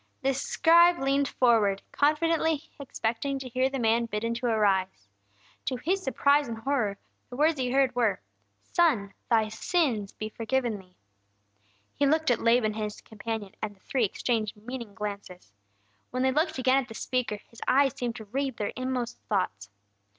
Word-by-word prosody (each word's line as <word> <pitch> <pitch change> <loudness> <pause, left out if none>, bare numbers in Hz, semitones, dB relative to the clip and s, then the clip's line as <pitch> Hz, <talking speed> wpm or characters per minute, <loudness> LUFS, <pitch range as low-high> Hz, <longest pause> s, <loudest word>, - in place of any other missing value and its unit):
The 270 +1 +2
scribe 340 +5 +4
leaned 275 0 +1
forward, 220 -7 +2
confidently 320 +1 +1
expecting 265 0 -2
to 265 -1 -6
hear 255 +2 +1
the 270 - -3
man 230 -1 +2
bidden 230 +2 -2
to 240 +1 -2
arise. 190 - +1 0.6
To 260 - -1
his 360 +10 -1
surprise 285 0 +2
and 230 -1 -5
horror, 225 -4 -1 0.3
the 245 - -8
words 305 +2 +2
he 250 -1 0
heard 265 0 +3
were: 235 -4 +1 0.4
"Son, 240 - +1 0.2
thy 220 -2 +3
sins 220 - 0
be 215 - -6
forgiven 230 0 -1
thee!" 185 -1 -19 1.0
He 285 - +2
looked 315 -1 +2
at 235 - +1
Laban 230 -2 +3
and 215 0 -3
his 210 -1 -5
companion, 220 -2 -6
and 210 -1 -4
the - - -29
three 255 +5 -1
exchanged 215 +1 -1
meaning 230 -1 -7
glances. 200 - -7 0.6
When 255 +1 -1
they 265 - +3
looked 310 +4 0
again 260 +1 +3
at 250 - -9
the 225 - -10
speaker, 250 -3 -1
His 230 - -16
eyes 270 -1 +4
seemed 240 -2 -3
to 220 - -8
read 265 +3 -2
their 205 - -2
inmost 255 -2 -3
thoughts. 110 - -1
245 Hz, 170 wpm, -28 LUFS, 215-275 Hz, 1.0 s, scribe